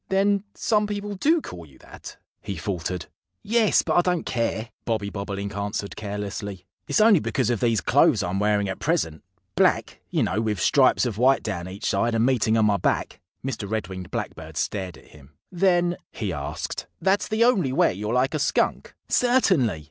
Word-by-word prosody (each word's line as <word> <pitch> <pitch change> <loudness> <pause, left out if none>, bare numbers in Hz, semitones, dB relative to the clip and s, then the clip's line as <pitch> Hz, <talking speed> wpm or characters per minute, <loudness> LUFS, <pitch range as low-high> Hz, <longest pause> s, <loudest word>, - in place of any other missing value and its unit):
"Then 200 +1 +2
some 210 -2 +1
people 205 0 -4
do 310 - +2
call 85 - -9
you 70 - -19
that!" - - -12 0.2
he 100 -1 -5
faltered. 90 -1 -3 0.4
"Yes! 220 0 +3
But - - +1
I - - +7
don't 180 -1 -1
care," 115 -1 -2
Bobby 110 -3 -2
Bobolink 100 0 -5
answered 100 0 -3
carelessly. 100 -2 -5 0.2
"It's - - +1
only 215 -4 +6
because 130 -5 0
of 120 - 0
these 115 -5 +2
clothes - - +3
I'm 90 +2 -2
wearing 105 -1 +2
at 95 - -4
present 145 - -1 0.3
black, - - +1
you - - +1
know, 105 - 0
with 105 -3 -1
stripes 130 -2 +4
of 115 -3 -3
white 130 +2 +4
down 90 -5 -4
each 95 +2 -7
side 115 +4 +1
and 115 +1 +3
meeting 115 -4 +2
on 110 - +4
my 105 -1 +3
back." - - -1 0.3
Mr. 115 -7 -4
Red 110 -4 -2
winged 95 -2 -7
Blackbird - - -6
stared 95 -3 -3
at - - -19
him. 75 -1 -17 0.2
"Then," 175 -1 +2
he 100 -5 -3
asked, 70 -2 -5
"that's 195 +1 +1
the 215 +2 +2
only 195 - +2
way 130 - +3
you're 105 +3 -4
like 130 +3 +2
a 155 - -1
Skunk?" 150 - 0
"Certainly!" 185 - +2
110 Hz, 185 wpm, -24 LUFS, -, 0.4 s, I